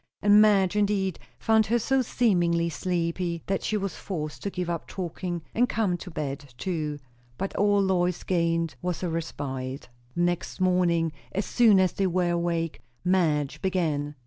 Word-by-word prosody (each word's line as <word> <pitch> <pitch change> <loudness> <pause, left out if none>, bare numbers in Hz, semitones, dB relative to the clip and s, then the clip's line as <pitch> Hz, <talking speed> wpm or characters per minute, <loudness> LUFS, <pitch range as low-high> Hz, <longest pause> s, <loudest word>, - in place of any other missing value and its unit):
And 205 +1 +7
Madge 200 -3 +4
indeed 200 -3 +1 0.2
found 220 -1 +3
her 235 +3 +3
so 265 +3 +2
seemingly 175 -9 +2
sleepy, 170 0 -2
that 195 0 -1
she 215 - 0
was 195 -4 -3
forced 155 -6 -5
to 200 - -2
give 180 -2 -3
up 170 -2 -3
talking 175 -2 -4
and 245 +1 +2
come 210 -5 +1
to 180 - -9
bed 140 -4 -5
too. 155 -4 -2 0.4
But 195 - -3
all 205 0 +3
Lois 180 -2 +1
had - - -14
gained 165 -2 0
was 180 0 -3
a 180 - 0
respite. 135 -6 -4 0.3
The 175 - 0
next 175 +1 -1
morning, 175 -3 +2 0.2
as 200 +2 -1
soon 220 -5 +5
as 185 -2 +3
they 195 - +1
were 180 -1 +1
awake, 170 -1 -1 0.2
Madge 160 -6 +1
began. 155 -6 -1
180 Hz, 170 wpm, -27 LUFS, 165-195 Hz, 0.4 s, And